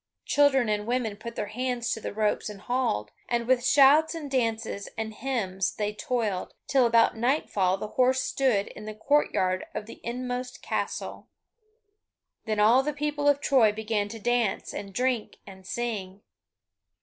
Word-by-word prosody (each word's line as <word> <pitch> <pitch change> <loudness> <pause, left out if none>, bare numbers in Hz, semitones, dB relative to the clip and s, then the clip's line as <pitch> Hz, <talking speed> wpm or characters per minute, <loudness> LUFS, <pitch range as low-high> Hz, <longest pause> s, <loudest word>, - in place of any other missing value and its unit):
Children 280 -4 +3
and 210 0 -1
women 240 -4 -1
put 235 +3 -8
their 205 - -3
hands 245 0 -2
to 225 - -5
the - - -4
ropes 210 0 0
and 200 -2 -9
hauled, 185 - -1 0.2
and 235 -1 0
with 250 0 +2
shouts 290 +5 +5
and 300 -4 -6
dances, 225 -5 -1
and 220 0 -3
hymns 195 -7 -2
they 210 0 -2
toiled, 210 -4 -2
till 260 -3 +3
about 230 0 +4
nightfall 220 -6 +1
the 210 +2 -6
horse 255 +2 +2
stood 245 -7 +1
in 210 - -10
the 215 0 -6
courtyard 190 -8 +1
of 210 - -4
the 225 - -12
inmost 250 +1 -4
castle. - - -4 1.2
Then 215 -2 -1
all 225 +5 +6
the 300 +2 -2
people 290 0 -1
of 285 0 +3
Troy 245 -7 +4
began 215 -1 -2
to 225 - -7
dance, 235 -2 0
and 200 -1 -6
drink, 245 +2 -1
and 190 -1 -13
sing. 205 -5 -4
230 Hz, 160 wpm, -27 LUFS, 210-255 Hz, 1.2 s, all